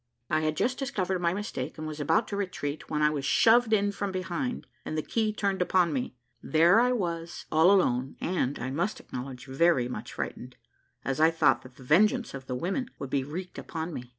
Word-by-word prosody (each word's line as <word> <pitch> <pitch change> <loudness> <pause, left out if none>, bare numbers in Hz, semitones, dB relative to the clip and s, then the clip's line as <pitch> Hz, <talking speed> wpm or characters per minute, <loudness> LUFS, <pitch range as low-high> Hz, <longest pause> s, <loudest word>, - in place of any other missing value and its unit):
I 155 - +3
had 155 0 -1
just 255 +1 0
discovered 195 -10 -1
my 170 -1 +2
mistake, 175 - -4
and 155 - -5
was 155 -1 -6
about 210 +10 +2
to 205 - -3
retreat, 170 -7 -4
when 150 -1 0
I 150 - +4
was 145 -2 -3
shoved 225 - +4
in 205 -2 +3
from 200 0 -3
behind, 185 +7 -3 0.2
and 155 - -4
the 155 - -1
key 220 -2 0
turned 200 -3 -1
upon 180 -2 +3
me; 130 -1 -3 0.3
there 170 +6 +5
I 250 +1 +3
was, 170 -7 -3
all 160 +3 +5
alone, 135 -10 +2
and, 155 -6 -1
I 130 +2 -4
must 175 +10 -1
acknowledge, 125 0 -7
very 135 -1 +2
much 125 - -6
frightened, - - -5 0.5
as 135 +2 -1
I 160 +1 +6
thought 145 -6 +3
that 130 -1 -15
the 130 - -14
vengeance 210 - +3
of 135 -1 -8
the 125 - -2
women 195 - -2
would 135 - -6
be 135 -2 +1
wreaked 180 +6 -6
upon 165 +1 -5
me. 125 -3 -7
165 Hz, 210 wpm, -28 LUFS, 140-200 Hz, 0.5 s, I